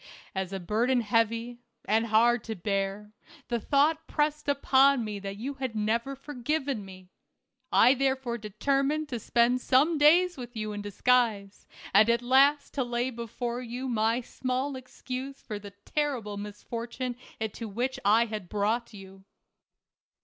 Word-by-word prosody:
As 190 Hz, -1 st, -3 dB
a 195 Hz, -, -3 dB
burden 235 Hz, +7 st, +1 dB
heavy, 230 Hz, +2 st, 0 dB, 0.3 s
and 225 Hz, +2 st, +2 dB
hard 230 Hz, +1 st, +4 dB
to 220 Hz, -, -4 dB
bear, 195 Hz, +2 st, -2 dB, 0.4 s
the 235 Hz, -1 st, 0 dB
thought 295 Hz, +6 st, +2 dB
pressed 300 Hz, -1 st, -1 dB
upon 275 Hz, -2 st, +4 dB
me 210 Hz, -1 st, -4 dB
that 200 Hz, 0 st, -6 dB
you 260 Hz, +7 st, -4 dB
had 260 Hz, -4 st, -4 dB
never 230 Hz, +5 st, -1 dB
forgiven 275 Hz, -2 st, -3 dB
me. 185 Hz, -1 st, -13 dB, 0.6 s
I 250 Hz, +3 st, +6 dB
therefore 265 Hz, -3 st, -1 dB
determined 275 Hz, +8 st, 0 dB
to 240 Hz, -, -3 dB
spend 240 Hz, +3 st, +2 dB
some 295 Hz, +6 st, +3 dB
days 345 Hz, +4 st, +5 dB
with 245 Hz, -1 st, -8 dB
you 215 Hz, -1 st, -3 dB
in 205 Hz, 0 st, -5 dB
disguise, 205 Hz, -1 st, 0 dB, 0.3 s
and 210 Hz, +3 st, +6 dB
at 235 Hz, +1 st, +2 dB
last 275 Hz, +3 st, +4 dB
to 270 Hz, -, 0 dB
lay 240 Hz, +1 st, -1 dB
before 235 Hz, +1 st, -4 dB
you 250 Hz, +2 st, -5 dB
my 230 Hz, 0 st, +1 dB
small 260 Hz, +3 st, -3 dB
excuse 260 Hz, +1 st, -7 dB
for 210 Hz, -2 st, -6 dB
the 205 Hz, 0 st, -9 dB, 0.2 s
terrible 260 Hz, -9 st, -2 dB
misfortune 230 Hz, +4 st, -5 dB, 0.2 s
into 220 Hz, +1 st, -4 dB
which 245 Hz, +6 st, -2 dB
1 225 Hz, +4 st, +4 dB
had 210 Hz, -5 st, -6 dB
brought 220 Hz, +3 st, -1 dB
you. 190 Hz, -1 st, -13 dB
235 Hz, 150 wpm, -28 LUFS, 210-265 Hz, 0.6 s, I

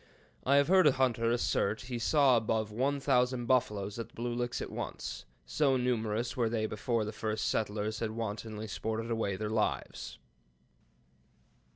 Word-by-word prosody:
I 140 Hz, -, +4 dB
have 140 Hz, 0 st, +5 dB
heard 185 Hz, -1 st, +6 dB
a 145 Hz, -, +5 dB
hunter 120 Hz, -3 st, +1 dB
assert 110 Hz, -3 st, +1 dB
he 120 Hz, -1 st, -5 dB
saw 135 Hz, +1 st, +4 dB
above 110 Hz, -1 st, 0 dB
one 135 Hz, +6 st, 0 dB
thousand 125 Hz, -2 st, +2 dB
buffaloes 105 Hz, -4 st, 0 dB
at 115 Hz, -, -4 dB
the -, -, -24 dB
Blue 120 Hz, +1 st, -2 dB
Licks 120 Hz, 0 st, -2 dB
at -, -, -5 dB
once; -, -, -5 dB, 0.2 s
so 65 Hz, -, +2 dB
numerous 120 Hz, -1 st, -1 dB
were 120 Hz, -4 st, +1 dB
they 110 Hz, -1 st, 0 dB
before 110 Hz, +1 st, -1 dB
the 105 Hz, -, -4 dB
first 110 Hz, 0 st, -2 dB
settlers 105 Hz, 0 st, -1 dB
had 115 Hz, -, -1 dB
wantonly 110 Hz, -1 st, -4 dB
sported 110 Hz, +2 st, -3 dB
away 110 Hz, -4 st, 0 dB
their 105 Hz, +2 st, -3 dB
lives." 110 Hz, -1 st, -2 dB
115 Hz, 165 wpm, -31 LUFS, 110-125 Hz, 0.2 s, heard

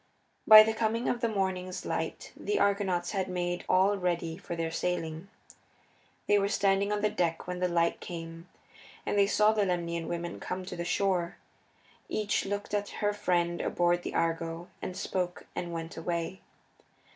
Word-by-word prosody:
By 215 Hz, 0 st, +12 dB
the 220 Hz, 0 st, 0 dB
coming 225 Hz, +2 st, 0 dB
of 240 Hz, -, 0 dB
the 235 Hz, -, +2 dB
morning's 185 Hz, -3 st, -2 dB
light -, -, -3 dB
the 415 Hz, -, -1 dB
Argonauts 195 Hz, -4 st, +1 dB
had 195 Hz, -3 st, -1 dB
made 175 Hz, -1 st, -2 dB
all 195 Hz, +2 st, +4 dB
ready 170 Hz, -2 st, -1 dB
for 170 Hz, -1 st, -6 dB
their 165 Hz, -1 st, -2 dB
sailing. 165 Hz, 0 st, -2 dB, 1.0 s
They 205 Hz, 0 st, +4 dB
were 200 Hz, -, +1 dB
standing 200 Hz, 0 st, +2 dB
on 210 Hz, 0 st, 0 dB
the 210 Hz, -, +4 dB
deck 170 Hz, -5 st, -1 dB
when 180 Hz, 0 st, -4 dB
the 180 Hz, -, +2 dB
light 170 Hz, -1 st, +1 dB
came, 165 Hz, 0 st, -8 dB, 0.6 s
and -, -, -1 dB
they 200 Hz, -1 st, +5 dB
saw 210 Hz, +1 st, +4 dB
the 215 Hz, -1 st, +2 dB
Lemnian 170 Hz, -3 st, -1 dB
women 170 Hz, 0 st, -4 dB
come 185 Hz, 0 st, -4 dB
to 180 Hz, -, -6 dB
the 170 Hz, -, -3 dB
shore. 180 Hz, -2 st, 0 dB, 0.7 s
Each 210 Hz, -2 st, 0 dB
looked 205 Hz, +1 st, -4 dB
at 205 Hz, 0 st, 0 dB, 0.2 s
her 205 Hz, -, +2 dB
friend 175 Hz, -4 st, 0 dB
aboard 175 Hz, 0 st, +1 dB
the -, -, -5 dB
Argo, 165 Hz, +1 st, -1 dB
and 185 Hz, -, -5 dB
spoke, 180 Hz, -1 st, -2 dB
and 175 Hz, -1 st, -3 dB
went 165 Hz, 0 st, -5 dB
away. 170 Hz, +2 st, -3 dB
180 Hz, 170 wpm, -30 LUFS, 170-200 Hz, 1.0 s, By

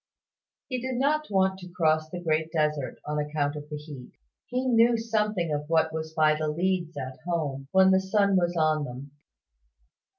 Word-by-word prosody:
He 255 Hz, -3 st, -3 dB
did 260 Hz, 0 st, -3 dB
not 300 Hz, +4 st, +1 dB
want 190 Hz, -1 st, +1 dB
to 180 Hz, -1 st, -10 dB
cross 155 Hz, -3 st, +1 dB
the 180 Hz, -, -6 dB
Great 160 Hz, -1 st, 0 dB
Desert, 150 Hz, -4 st, -1 dB
on 150 Hz, 0 st, -2 dB
account 150 Hz, 0 st, -1 dB
of 150 Hz, 0 st, -8 dB
the 150 Hz, -, -4 dB
heat. 145 Hz, -4 st, -10 dB, 0.3 s
He 255 Hz, +1 st, -2 dB
knew 235 Hz, -1 st, +4 dB
something 210 Hz, -7 st, -1 dB
of 145 Hz, 0 st, -2 dB
what 160 Hz, -1 st, +3 dB
that -, -, -14 dB
was 160 Hz, 0 st, -4 dB
by 155 Hz, -1 st, +4 dB
the 155 Hz, 0 st, -2 dB
leads 170 Hz, 0 st, -1 dB
at 130 Hz, -1 st, -6 dB
home, 150 Hz, -6 st, -3 dB
when 190 Hz, 0 st, +6 dB
the 190 Hz, -, +5 dB
sun 200 Hz, +1 st, +2 dB
was 175 Hz, -1 st, +1 dB
on 155 Hz, -1 st, +2 dB
them. 130 Hz, +2 st, -8 dB
160 Hz, 190 wpm, -27 LUFS, 150-190 Hz, 0.3 s, when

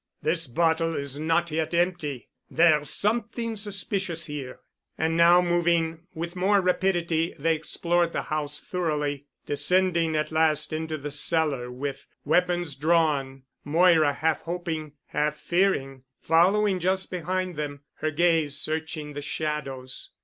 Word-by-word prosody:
This 165 Hz, 0 st, 0 dB
bottle 165 Hz, +4 st, +1 dB
is 140 Hz, 0 st, -4 dB
not 165 Hz, +2 st, +1 dB
yet 160 Hz, +1 st, -1 dB
empty. 170 Hz, -7 st, -1 dB, 0.2 s
There's 155 Hz, -3 st, +3 dB
something 230 Hz, +1 st, -1 dB
suspicious 195 Hz, -4 st, -3 dB
here." 145 Hz, -5 st, -7 dB, 0.4 s
And 160 Hz, +1 st, 0 dB
now 170 Hz, +1 st, +6 dB
moving 170 Hz, -1 st, +1 dB
with 170 Hz, +2 st, -5 dB
more 195 Hz, +3 st, +3 dB
rapidity 175 Hz, -3 st, 0 dB
they 165 Hz, +3 st, +2 dB
explored 170 Hz, +2 st, 0 dB
the -, -, -2 dB
house 150 Hz, -1 st, -2 dB
thoroughly, 150 Hz, -5 st, -2 dB, 0.2 s
descending 170 Hz, +2 st, +2 dB
at 155 Hz, +1 st, -1 dB
last 155 Hz, -1 st, +2 dB
into 160 Hz, 0 st, -3 dB
the 145 Hz, 0 st, -6 dB
cellar, 145 Hz, -4 st, 0 dB
with, 135 Hz, +2 st, -5 dB, 0.2 s
weapons 175 Hz, 0 st, +1 dB
drawn, 145 Hz, -3 st, +1 dB, 0.2 s
Moira, 160 Hz, -1 st, +4 dB
half 160 Hz, +1 st, 0 dB
hoping, 165 Hz, -3 st, -4 dB
half 150 Hz, 0 st, -1 dB
fearing, 170 Hz, -8 st, 0 dB, 0.2 s
following 190 Hz, +4 st, +3 dB
just 190 Hz, +2 st, 0 dB
behind 185 Hz, +1 st, -2 dB
them, 145 Hz, -1 st, -5 dB, 0.2 s
her 155 Hz, -, -1 dB
gaze 160 Hz, -2 st, +2 dB
searching 155 Hz, -1 st, -3 dB
the 145 Hz, -, -5 dB
shadows. 140 Hz, -4 st, -4 dB
160 Hz, 130 wpm, -26 LUFS, 150-175 Hz, 0.4 s, now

